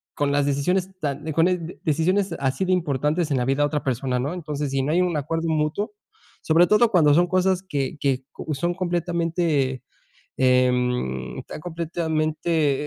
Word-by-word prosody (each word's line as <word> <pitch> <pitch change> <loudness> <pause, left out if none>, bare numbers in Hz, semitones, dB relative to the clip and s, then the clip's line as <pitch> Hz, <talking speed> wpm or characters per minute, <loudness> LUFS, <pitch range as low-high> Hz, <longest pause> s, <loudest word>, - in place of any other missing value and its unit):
con 145 -1 0
las 145 0 +2
decisiones 175 +7 0
tan 145 -2 -3
de 155 - -3
con 165 +3 +4
el 180 -2 -1
de - - -11
decisiones 175 +4 +1
así 135 +5 0
de 185 - +2
importantes 150 -1 0
en 135 - +2
la 125 - 0
vida 135 +2 +1
de 145 - +3
otra 150 0 -2
persona, 125 -1 -1
¿no? 145 +7 -2
Entonces, 150 -5 -4
si 135 -1 0
no 145 - -1
hay 180 - +3
un 175 -4 0
acuerdo 165 +3 -2
mutuo, 160 +8 -1 0.5
sobre 165 +2 +4
todo 220 +2 +4
cuando 155 -7 +5
son 175 +4 +4
cosas 185 0 +1
que 145 -5 -3
que, 135 -2 0
oh, 155 - -4
son 175 +4 -1
completamente, 170 -7 -1 0.5
eh, 130 -1 +4
em, 95 - -2
tan - - -8
completamente, 160 -3 -1
155 Hz, 185 wpm, -23 LUFS, 140-175 Hz, 0.5 s, cuando